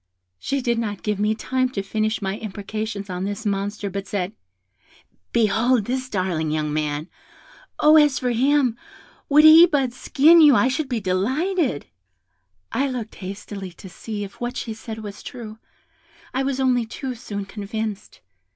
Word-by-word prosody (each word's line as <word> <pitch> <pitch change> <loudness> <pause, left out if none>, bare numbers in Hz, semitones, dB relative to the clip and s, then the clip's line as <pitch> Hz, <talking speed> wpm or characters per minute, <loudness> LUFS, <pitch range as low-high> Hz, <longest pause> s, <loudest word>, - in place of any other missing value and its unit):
"She 275 -1 -2
did 235 -1 +1
not 205 -4 -4
give 210 -2 -1
me 210 +1 +1
time 255 +3 -1
to 195 - -2
finish 215 +1 -1
my 195 +1 -2
imprecations 210 0 -5
on 180 -1 -4
this 205 +3 -4
monster, 205 +1 -2
but 195 0 -5
said, 190 0 -2 1.0
'Behold 230 +1 +2
this 255 +2 -3
darling 180 -6 -1
young 150 -1 -1
man! 150 0 -2 0.7
Oh, 305 +1 +7
as 295 -3 +5
for 250 -1 -1
him, 260 0 +2 0.5
would 300 +1 +6
he 320 +2 +10
but 275 -7 0
skin 315 +6 +5
you 295 -4 +7
I 255 - +4
should 270 +1 -2
be 245 -3 -1
delighted.' 255 - 0 0.9
I 275 +3 +1
looked 240 -4 -5
hastily 195 -1 -7
to 185 +2 -12
see 210 +2 -6
if 200 +3 -10
what 245 +1 -3
she 225 - -4
said 220 0 -8
was 205 -1 -8
true; 220 -3 -9 0.7
I 265 - 0
was 270 0 -1
only 250 -3 +2
too 260 +3 -5
soon 205 -4 -6
convinced. 210 +1 -6
220 Hz, 160 wpm, -23 LUFS, 200-260 Hz, 1.0 s, he